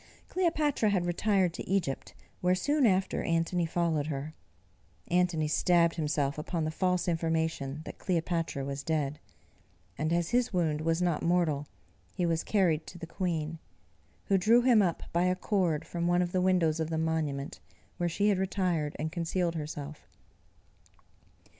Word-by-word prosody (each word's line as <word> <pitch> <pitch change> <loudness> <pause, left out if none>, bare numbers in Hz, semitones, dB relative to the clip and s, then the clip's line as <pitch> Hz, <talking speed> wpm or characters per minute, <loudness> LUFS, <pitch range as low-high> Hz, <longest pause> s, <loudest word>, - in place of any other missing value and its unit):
Cleopatra 310 - +1
had 185 -3 +1
retired 185 0 +1
to - - -7
Egypt, 180 -9 -1 0.3
where 180 +1 +3
soon 285 +6 +2
after 190 -1 +1
Antony 165 +1 0
followed 160 -3 0
her. 150 +1 -4 0.8
Antony 175 -3 +2
stabbed 170 +1 +3
himself 150 -3 -1
upon 165 +1 -2
the 155 - -1
false 180 +2 0
information 160 -3 -1
that - - -9
Cleopatra 165 -5 -1
was 140 0 -4
dead; 150 -1 -1 0.8
and 155 +2 0
as 170 +1 0
his 245 0 +2
wound 160 -5 0
was 165 +2 +1
not 170 -4 +1
mortal, 165 -5 +1 0.5
he 180 - 0
was 165 -1 0
carried 175 -7 +1
to 175 - -9
the 170 - -7
queen, 165 -3 -3 0.7
who 195 -1 +3
drew 230 +6 +5
him 240 -4 +5
up 175 -4 0
by 170 +1 +2
a 180 0 +2
cord 185 -5 0
from 170 0 -2
one 175 +1 +3
of 175 - -3
the 185 - +1
windows 175 -4 +2
of 160 0 -1
the 160 - -1
monument, 155 -4 -2 0.4
where 175 -1 0
she 200 +5 +1
had 195 -3 +2
retired 180 -6 -1
and 155 +1 -3
concealed 170 0 -1
herself. 150 -1 -6
170 Hz, 160 wpm, -30 LUFS, 155-185 Hz, 0.8 s, drew